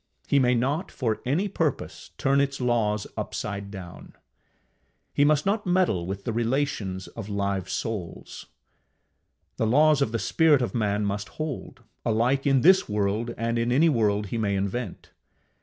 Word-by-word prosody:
He 140 - +3
may 125 -1 +3
not, 140 +10 -1
for 115 -5 -2
any 165 +10 +1
purpose, 165 -8 -3
turn 140 +1 +2
its 140 -1 -1
laws 110 -4 +1
upside 100 -1 -4
down. 95 -3 -10 1.0
He 145 - +3
must 150 0 +3
not 205 0 0
meddle 175 - +2
with 100 +1 -5
the 115 - -2
relations 115 -6 -1
of 110 -3 -8
live 100 -2 -2
souls. 95 -1 -5 1.1
The 110 - +1
laws 150 +4 +4
of 115 - +1
the 115 - 0
spirit 150 +2 +3
of 120 - -3
man 105 -3 0
must 100 +1 -3
hold, 155 -4 -5 0.2
alike 120 +5 +1
in 135 -2 +4
this 190 +6 +5
world 105 +3 -1
and 115 +1 -1
in 120 +1 0
any 155 +6 +4
world 105 -6 +1
he 115 - -2
may 100 -2 0
invent. 100 +1 -4
115 Hz, 155 wpm, -26 LUFS, 105-140 Hz, 1.1 s, this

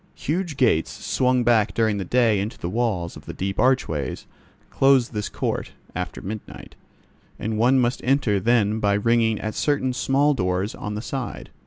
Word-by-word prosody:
Huge 165 -1 -2
gates, 110 - +2
swung 125 -1 0
back 115 -3 +2
during 110 -3 +1
the - - -2
day 115 +1 +2
into 105 +4 -4
the 85 - -4
walls 105 -7 -1
of - - -13
the - - -6
deep 95 +1 -3
archways, 80 - 0 0.5
close 135 -3 +4
this 105 -2 -4
court, - - -3 0.2
after 90 +1 -5
midnight, 95 - -8 0.6
and 110 0 -3
one 125 +4 +4
must 125 -1 +1
enter 125 -6 +2
then 110 0 +2
by 100 -1 +2
ringing 115 0 +2
at 110 0 -4
certain 140 -3 0
small 140 +3 +2
doors 95 -2 -1
on 105 0 -5
the 105 - -5
side. 135 -1 -5
110 Hz, 170 wpm, -23 LUFS, 100-125 Hz, 0.6 s, close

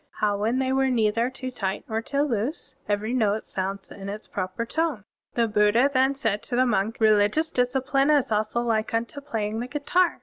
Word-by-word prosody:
"How 210 -2 +2
when 220 +5 0
they 260 0 +1
were 265 0 +2
neither 230 0 +2
too 260 0 -6
tight 195 -5 -3
nor 225 0 -1
too 280 +4 -1
loose?" 265 +2 -2 0.2
"Every 210 +3 0
note 215 -3 +1
sounds 195 0 -4
in 195 0 -7
its 210 +2 -7
proper 185 +4 -3
tone." 310 -4 -1 0.3
The 235 -1 +2
Buddha 215 +5 +3
then 265 +1 +3
said 220 -6 -1
to 245 - -4
the 255 +1 +4
monk, 220 -1 0
" - - -33
Religious 215 +8 +3
disci 250 +1 0
pline 275 0 +2
is 290 -6 +3
also 215 +2 0
like 225 -2 0
tmto 235 +5 -3
playing 220 -4 -2
the 245 - -3
guitar. 335 +6 +1
230 Hz, 205 wpm, -25 LUFS, 210-265 Hz, 0.3 s, the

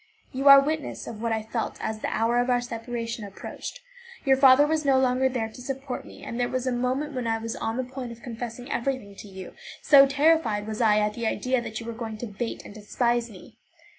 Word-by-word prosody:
You 270 +2 -1
are 275 0 +11
witness 305 +2 -2
of 215 -1 -8
what 230 -1 -1
I 220 -1 -1
felt 225 +1 -3
as 220 0 -3
the - - -3
hour 230 +2 +1
of 245 +1 0
our 245 -1 +3
separation 230 -1 -5
approached; 205 - -8 0.4
your 270 -1 +5
father 265 +1 +7
was 310 +1 0
no 275 -2 +4
longer 260 0 +2
there 235 -4 -2
to 250 - -12
support 270 0 -5
me, - - -13
and 235 - -5
there 245 - +1
was 255 0 -2
a 255 - 0
moment 255 +5 -1
when 250 -3 -3
I 225 0 +1
was 225 0 -5
on 225 +1 -3
the 260 - 0
point 255 -1 -7
of 235 0 -12
confessing 245 +2 -6
everything 240 -4 -2
to - - -10
you, 190 -1 -9 0.3
so 275 -2 +8
terrified 280 -7 +2
was 220 +2 -4
I 215 -2 +4
at 210 0 +1
the 235 0 -3
idea 255 +2 0
that 220 -2 -5
you 230 - -8
were 230 - -5
going 225 -1 -6
to 220 -1 -6
hate 235 - -4
and - - -10
despise 235 +3 -1
me. 185 -5 -14
240 Hz, 235 wpm, -26 LUFS, 225-265 Hz, 0.4 s, are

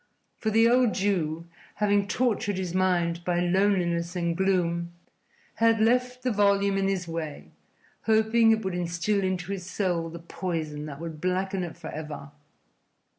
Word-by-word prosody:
For 220 - 0
the 225 +2 +5
old 245 -2 +3
Jew, 170 -5 0 0.3
having 205 -1 +2
tortured 210 -4 0
his 185 -2 -3
mind 175 -2 +1
by 175 0 0
loneliness 175 -2 +1
and 170 -1 0
gloom, 170 -2 0 0.6
had 230 -1 +4
left 250 +3 +1
the 255 - +1
volume 200 -1 +3
in 195 0 +1
his 190 -2 -1
way, 165 -3 -6 0.5
hoping 220 +1 +4
it 220 -2 +2
would 190 - -1
instil 175 +3 -1
into 185 0 -2
his 185 -2 -5
soul 175 -4 -1
the 170 - -8
poison 160 -3 -4
that 140 -2 -8
would 160 -2 -7
blacken 185 +1 -1
it 170 -2 -6
for 170 - -8
ever. 150 -2 -7
185 Hz, 155 wpm, -27 LUFS, 170-205 Hz, 0.6 s, the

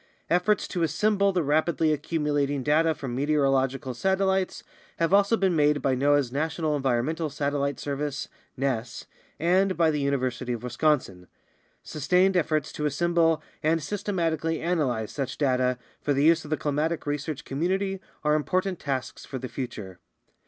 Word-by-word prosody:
Efforts 180 +4 +2
to 175 - -3
assemble 200 +5 +2
the 180 -3 0
rapidly 155 +2 +2
accumulating 145 -2 -1
data 160 +2 +3
from 135 -4 -5
meteorological 135 -2 +1
satellites 190 +6 0 0.3
have 165 +2 +1
also 200 +3 +4
been 190 -4 +2
made 150 -1 +3
by 135 -2 +1
noaa's 140 -1 +2
National 155 +2 -1
Environmental 140 +4 0
Satel 145 0 -2
lite 140 0 -1
Service 145 0 -3 0.3
(ness) 125 -3 -2 0.3
and 185 +4 +2
by 165 -2 +4
the 150 - -1
University 130 -3 -1
of 120 0 -6
Wisconsin. 125 - 0 0.6
Sustained 180 +6 +2
efforts 155 -4 +1
to 150 - -2
assemble 165 +1 +2 0.2
and 160 0 +1
systematically 165 -4 -1
analyze 140 -11 -1
such 135 -3 -4
data 125 -3 +1 0.2
for 145 - +1
the 140 - +2
use 165 +1 +4
of 150 - -10
the 155 - 0
climatic 150 +3 -1
research 145 0 -3
community 190 +7 -1 0.2
are 150 0 +3
important 185 +4 0
tasks 135 -3 -4
for 135 - -6
the 130 0 -5
future. 105 -9 -6
150 Hz, 150 wpm, -26 LUFS, 135-170 Hz, 0.6 s, also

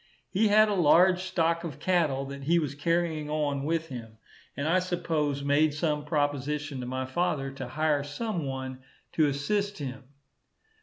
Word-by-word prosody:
He 215 +3 +3
had 215 +1 +6
a 210 - 0
large 180 +1 +5
stock 170 -2 0
of 155 -5 -6
cattle, 150 -5 +1
that 140 0 -7
he 170 +3 +4
was 150 -5 -1
carrying 160 0 0
on 145 -2 -1
with 165 +1 -1
him; 115 -4 -8 0.4
and 140 - -1
I 175 +3 +4
suppose 160 -6 -1
made 145 +1 +3
some 150 -2 -1
proposition 145 -1 -1
to 125 - -5
my 130 +1 -2
father 135 -1 -1
to 135 -2 -6
hire 150 +2 +1
some 175 +5 -3
one 130 -1 -5 0.3
to 155 -2 +3
assist 200 +9 -1
him. 135 -2 -6
150 Hz, 165 wpm, -28 LUFS, 140-170 Hz, 0.4 s, had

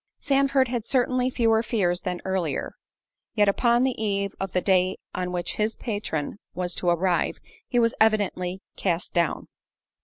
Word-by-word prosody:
Sandford, 275 -1 +2
had 240 -2 -2
certainly 255 +1 +1
fewer 225 -3 +2
fears 190 -6 0
than 180 -1 -3
either; 185 -6 -1 0.6
yet 210 -2 +4
upon 235 +4 +3
the 255 -4 0
eve 200 -1 -1
of 195 -1 -3
the 180 - +2
day 185 0 +2 0.2
on 180 0 -2
which 175 -1 -3
his 215 +1 0
patron 205 - -3 0.2
was 180 0 -1
to 175 - 0
arrive, 175 +1 +1 0.3
he 245 - -1
was 230 -1 +3
evidently 195 -4 +1
cast 175 -2 -1
down. 170 -2 0
200 Hz, 155 wpm, -25 LUFS, 180-235 Hz, 0.6 s, yet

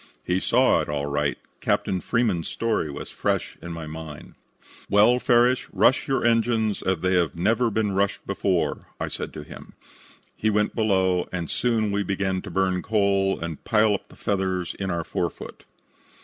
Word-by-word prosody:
He 90 +1 0
saw - - +3
it - - -5
all 70 -1 -1
right. 70 0 -1 0.2
Captain 95 -2 0
Freeman's 110 -9 0
story 115 -9 -1
was 70 - -7
fresh - - -1
in 85 - -7
my 80 -1 -6
mind. 80 -1 -9 0.6
"'Well, 105 +5 +5
Farrish, 125 0 +3
rush 130 - +3
your 135 -4 0
engines 115 -2 +2
as 95 -3 -1
they 95 0 +1
have 85 -3 +1
never 115 +7 +2
been 110 -1 0
rushed 100 +1 0
before,' 95 -2 -1
I - - -2
said - - -4
to 75 - -7
him. - - -12 0.6
He 110 - 0
went 105 0 +1
below, 95 -5 +1
and 85 -3 -4
soon 115 -4 +1
we 100 0 0
began 95 -1 -1
to - - -8
burn 95 0 0
coal 100 -2 +1
and 85 -2 -6
pile 110 -1 +3
up 100 +1 -4
the - - -16
feathers 95 -3 -1
in 95 -1 -2
our 85 -2 -1
forefoot. - - -5
95 Hz, 175 wpm, -24 LUFS, 90-110 Hz, 0.6 s, Well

